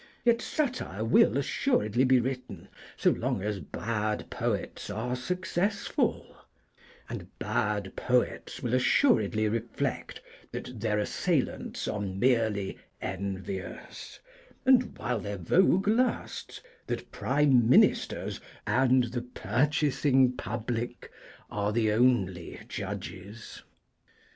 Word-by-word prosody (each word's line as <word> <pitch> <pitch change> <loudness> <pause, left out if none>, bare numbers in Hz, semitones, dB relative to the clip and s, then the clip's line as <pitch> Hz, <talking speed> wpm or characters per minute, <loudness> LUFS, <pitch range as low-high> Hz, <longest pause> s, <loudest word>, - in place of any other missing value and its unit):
Yet 235 0 +4
satire 245 - -2
will 115 +1 +5
assuredly 130 - +1
be 130 0 +5
written 130 +1 -5 0.3
so - - +4
long 95 - -1
as 105 -1 -2
bad 110 0 -3
poets - - -3
are 115 +5 -2
successful, 180 - -1 0.7
and - - -6
bad 105 -3 -1
poets 125 +2 0
will 120 -1 -1
assuredly 125 - +3
reflect 115 +1 -3 0.3
that 125 -3 -6
their 105 -1 0
assailants 105 - -1
are 105 - -2
merely 105 0 0 0.2
envious, 95 0 -6 0.5
and, 255 -1 +4
while 120 - -1
their 100 +1 -4
vogue 185 - +3
lasts, 240 +4 0 0.3
that - - -4
Prime 135 -4 +3
Ministers - - +3 0.2
and 130 0 +4
the 120 +1 -3
purchasing 130 +2 +2
public 120 +1 -4 0.4
are 105 0 0
the 110 -1 +2
only 105 -7 +1
judges. 95 +6 -7
120 Hz, 100 wpm, -29 LUFS, 105-130 Hz, 0.7 s, will